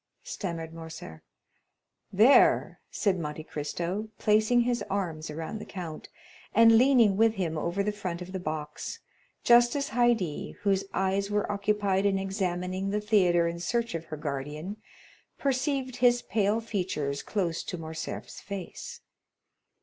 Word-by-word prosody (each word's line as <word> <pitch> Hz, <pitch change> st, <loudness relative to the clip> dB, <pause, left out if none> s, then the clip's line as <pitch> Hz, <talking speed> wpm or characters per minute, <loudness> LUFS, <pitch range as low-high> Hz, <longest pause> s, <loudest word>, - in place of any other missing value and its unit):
stammered 165 Hz, -4 st, -5 dB
Morcerf. 160 Hz, -, -9 dB, 0.9 s
"There," 220 Hz, +8 st, +5 dB
said 195 Hz, -4 st, 0 dB
Monte 150 Hz, -1 st, -5 dB
Cristo 170 Hz, +8 st, -4 dB
placing 215 Hz, +3 st, +3 dB
his 240 Hz, 0 st, 0 dB
arms 170 Hz, -6 st, -2 dB
around 165 Hz, +8 st, -5 dB
the -, -, -8 dB
count, 170 Hz, -5 st, -7 dB, 0.5 s
and 230 Hz, 0 st, +7 dB
leaning 235 Hz, -5 st, +5 dB
with 225 Hz, 0 st, +4 dB
him 170 Hz, -5 st, -2 dB
over 175 Hz, +5 st, -1 dB
the 210 Hz, -, 0 dB
front 185 Hz, -5 st, -4 dB
of 180 Hz, +1 st, -8 dB
the 190 Hz, -, -3 dB
box, 155 Hz, -3 st, -5 dB, 0.5 s
just 240 Hz, +1 st, +6 dB
as 280 Hz, -1 st, -1 dB
Haydée, 220 Hz, -7 st, +1 dB
whose 195 Hz, -1 st, +2 dB
eyes 195 Hz, +1 st, 0 dB
were 205 Hz, 0 st, 0 dB
occupied 205 Hz, -1 st, +1 dB
in 195 Hz, -1 st, +2 dB
examining 190 Hz, -1 st, -2 dB
the 210 Hz, +1 st, 0 dB
theatre 185 Hz, -5 st, +3 dB
in 170 Hz, 0 st, -4 dB
search 235 Hz, +6 st, -1 dB
of 165 Hz, 0 st, -4 dB
her 155 Hz, -1 st, -7 dB
guardian, 150 Hz, +6 st, -5 dB, 0.6 s
perceived 265 Hz, -1 st, -1 dB
his 245 Hz, -1 st, +4 dB
pale 210 Hz, 0 st, +1 dB
features 175 Hz, -10 st, -2 dB
close 175 Hz, -6 st, -2 dB
to 180 Hz, -, -5 dB
Morcerf's 160 Hz, -1 st, -6 dB
face. 200 Hz, -, -7 dB
195 Hz, 140 wpm, -28 LUFS, 165-220 Hz, 0.9 s, and